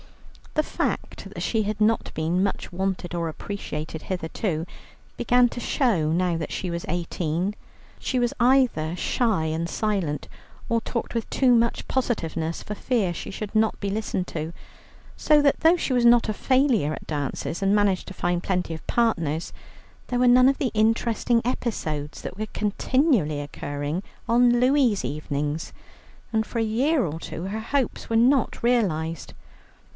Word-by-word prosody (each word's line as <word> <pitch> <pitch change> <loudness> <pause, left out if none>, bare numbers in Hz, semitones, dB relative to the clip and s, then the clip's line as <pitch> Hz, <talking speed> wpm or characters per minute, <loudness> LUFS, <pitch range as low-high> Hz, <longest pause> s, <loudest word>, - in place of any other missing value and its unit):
The 305 - +3
fact - - -3
that - - -7
she 225 - +1
had 210 0 -3
not 220 +1 +2
been 165 +4 +1
much 195 -2 -3
wanted 190 -1 -2
or 170 -1 -1
appreciated 160 -3 -5
hitherto 170 -1 -2 0.5
began 245 +1 +4
to 240 - -6
show 215 - +1
now 175 0 +1
she 180 - -3
was 170 0 -4
eighteen. 175 +2 -1 0.4
She 260 - -1
was 240 -1 +1
either 240 -11 +3
shy 215 -4 +1
and 160 +2 -2
silent, 190 -10 -1 0.4
or 230 0 +1
talked 235 +1 -4
with 230 -2 -2
too 255 -2 +3
much 235 0 +1
positiveness 170 -10 -2
for 210 - -5
fear 210 -7 0
she - - -6
should 210 +2 -6
not 220 0 +2
be 200 - -2
listened 205 -3 -2
to; 160 +1 -4 0.6
so 300 -1 +4
that 285 -1 +3
though 330 +3 +6
she 280 - -1
was 245 -1 +3
not 235 -1 +6
a 215 - 0
failure 255 - +2
at - - -8
dances 150 +3 -3
and 195 +1 +3
managed 200 -3 +2
to - - -7
find 175 -1 -1
plenty 180 -3 -1
of 160 - -8
partners, 170 -10 0 0.5
there 245 - -1
were 250 - +4
none 255 +1 +7
of 275 - 0
the 265 -5 -1
interesting 225 +2 +2
episodes 155 - -3
that 185 - -6
were 215 +1 -3
continually 210 - +1
occurring 145 +3 -4 0.3
on 240 +1 +4
Louie's 250 -5 +3
evenings, 150 +1 -3 0.6
and 220 0 +2
for 235 - -6
a - - +2
year 255 +5 +2
or 160 0 -4
two 165 - -6
her 200 +4 -3
hopes 270 +3 -2
were 225 - 0
not 255 +2 +3
realized. 170 -10 0
205 Hz, 160 wpm, -25 LUFS, 165-240 Hz, 0.6 s, none